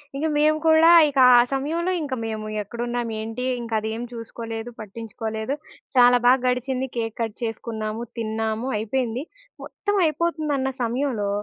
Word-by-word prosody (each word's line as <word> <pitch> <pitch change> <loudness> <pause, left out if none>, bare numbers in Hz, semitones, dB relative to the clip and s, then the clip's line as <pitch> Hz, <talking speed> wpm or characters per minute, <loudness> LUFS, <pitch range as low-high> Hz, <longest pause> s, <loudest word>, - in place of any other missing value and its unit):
ఇంకా 300 +3 -1
మేము 305 +1 +4
కూడా 320 +1 +7 0.2
ఇక 280 - -7 0.2
ఆ - - +8
సమయంలో 325 +7 -1
ఇంకా 280 -4 -3
మేము 215 -1 -4 0.2
ఎక్కడున్నాము, 240 +2 -3
ఏంటి 225 +3 -5 0.2
ఇంక 235 -1 -8
అదేం 220 +1 -4
చూసుకోలేదు 230 0 -6
పట్టించుకోలేదు. 220 +2 -5 0.4
చాలా 245 0 +7
బాగా 255 +1 +5
గడిచింది 255 +1 -1
కేక్ 225 -2 -2
కట్ 225 -2 -2
చేసుకున్నాము, 225 0 -4 0.2
తిన్నాము 220 +2 -2
అయిపోయింది. 235 +3 -2 0.4
మొత్తం 410 -1 -2
అయిపోతుందన్న 305 -4 0
సమయంలో 235 -3 -1
240 Hz, 130 wpm, -23 LUFS, 225-270 Hz, 0.4 s, ఆ